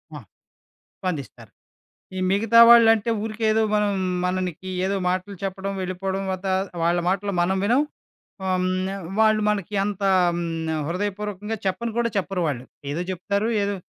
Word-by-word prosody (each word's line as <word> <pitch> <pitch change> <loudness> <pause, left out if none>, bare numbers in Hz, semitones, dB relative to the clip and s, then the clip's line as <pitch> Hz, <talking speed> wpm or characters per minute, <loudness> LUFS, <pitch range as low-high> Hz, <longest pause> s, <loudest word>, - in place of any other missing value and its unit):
ఆ! - - -6 0.8
స్పందిస్తారు. 165 -8 -5 0.7
ఈ - - -3
మిగతా 225 +4 +3
వాళ్ళంటే 225 -1 +6
ఊరికే 220 +1 -4
ఏదో 220 +1 +2
మనం 210 -1 +2 0.3
మననికి 185 -1 -2 0.2
ఏదో 195 +1 0
మాటలు 185 +2 -2
చెప్పడం, 195 +1 -3
వెళ్ళిపోడం 190 +1 -3
వతా 190 +1 -2 0.3
వాళ్ళ 170 +1 +2
మాటలు 200 +2 0
మనం 190 +2 +1
వినం. 245 +7 +3 0.6
హ్మ్. 185 -1 0 0.2
నా 195 - -4 0.2
వాళ్ళు 215 -1 +4
మనకి 205 -1 -2
అంత 205 -1 -3 0.3
హ్మ్. 170 - -2 0.3
నా - - 0
హృదయపూర్వకంగా 205 +3 -3
చెప్పని 230 +5 -1
కూడా 235 0 +1
చెప్పరు 195 -1 -1
వాళ్ళు. 130 -4 -3 0.3
ఏదో 160 +4 -2
జెప్తారు 200 +4 -1
ఏదో 200 0 -1
195 Hz, 145 wpm, -23 LUFS, 185-210 Hz, 0.8 s, వాళ్ళంటే